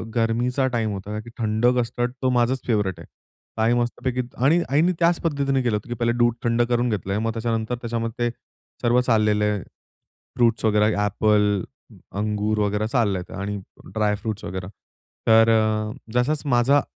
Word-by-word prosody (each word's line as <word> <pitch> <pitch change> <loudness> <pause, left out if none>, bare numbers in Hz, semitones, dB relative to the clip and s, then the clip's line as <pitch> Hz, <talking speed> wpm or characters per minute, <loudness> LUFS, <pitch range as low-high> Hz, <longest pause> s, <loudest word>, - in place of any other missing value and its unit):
गरमीचा 120 +3 +1
time 115 -4 -1
होता 105 +2 -5
की 110 - -10
थंड 110 0 0
कस्टर्ड 120 +1 -1
तो 130 - +2
माझाच 120 +2 +2
फेव्हरेट 105 -6 0
आहे - - -11 0.5
काही 110 +2 +3
मस्तपैकी 120 +1 -1 0.2
आणि 165 +5 +4
आईनी 155 +6 +3
त्याच 170 0 +3
पद्धतीने 140 -4 0
केलं 120 -3 +1
होतं, 105 - -5
की - - -2
पहिले 120 0 0
दूध 120 -1 +3
थंड 115 0 +2
करून 120 0 +1
घेतलं 100 -3 -2
आहे, 105 - 0
मग 115 - 0
त्याच्यानंतर 115 0 -2
त्याच्यामध्ये 115 0 -2
ते - - -8 0.5
सर्व 120 +1 +3
चाललेले 105 -3 +2 0.9
फ्रुट्स 115 -2 +2
वगैरे 105 -1 +3 0.2
ॲपल, 105 -1 +2 0.5
अंगूर 105 +1 -1
वगैरे 105 +1 0
चाललं 110 -6 +1
आहे 90 - -9
आणि 100 +1 -3 0.4
ड्राय 105 -1 +1
फ्रुट्स 110 0 -5
वगैरे 90 0 -5 0.6
तर 115 0 +6
अ, 110 -1 +1 0.2
जसाच 130 +5 +1
माझा 135 +4 +4
115 Hz, 165 wpm, -23 LUFS, 105-120 Hz, 0.9 s, तर